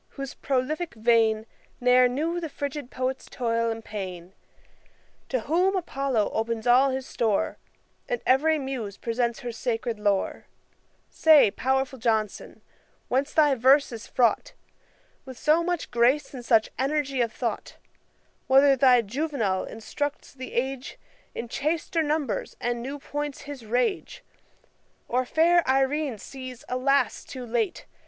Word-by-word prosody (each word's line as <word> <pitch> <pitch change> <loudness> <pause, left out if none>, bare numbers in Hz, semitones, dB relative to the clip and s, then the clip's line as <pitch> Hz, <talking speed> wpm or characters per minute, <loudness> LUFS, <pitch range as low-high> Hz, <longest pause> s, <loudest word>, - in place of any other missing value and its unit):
whose 275 -1 -5
prolific 285 +4 -2
vein 220 -1 +3 0.3
Ne'er 250 0 +5
knew 315 +8 -1
the 325 -2 -5
frigid 285 -1 -5
poet's 260 0 -3
toil 230 -1 -1
and 225 0 -5
pain; 185 -3 -7 1.0
To 255 -3 0
whom 360 - +1
APOLLO 275 - -1
opens 225 0 -2
all 255 +3 +5
his 260 0 -3
store, 220 -6 -1 0.5
And - - -1
every 310 +5 +3
Muse 260 -8 -5
presents 235 0 -2
her 245 - -4
sacred 230 -1 -3
lore; 205 -2 -1 0.6
Say, 305 -9 +6
pow'rful 265 +2 -1
JOHNSON, 220 -3 -2 0.5
whence 270 +3 0
thy 295 -3 +4
verse 265 +3 +4
is 230 -2 -8
fraught 250 - +1 0.7
With 260 -2 -10
so 310 +5 +3
much 350 -1 -2
grace 245 +6 +2
and 250 -2 -7
such 225 -2 +3
energy 275 -1 0
of 230 -2 0
thought; - - -4 0.7
Whether 270 +1 +6
thy 255 -2 +5
JUVENAL 230 -5 -1
instructs 285 +7 -5
the 260 -1 -8
age 265 +1 -3 0.4
In 240 - -4
chaster 320 +6 -1
numbers, 295 -5 -2
and 240 0 -2
new 275 +4 -5
points 290 0 -5
his 275 -6 -9
rage; 250 - -1 0.8
Or 255 +1 0
fair 340 +6 +4
IRENE 270 -1 +1
sees, 255 +3 -9
alas! 255 0 +1
too 255 -2 -8
late. 230 -1 -2
260 Hz, 135 wpm, -26 LUFS, 230-285 Hz, 1.0 s, Say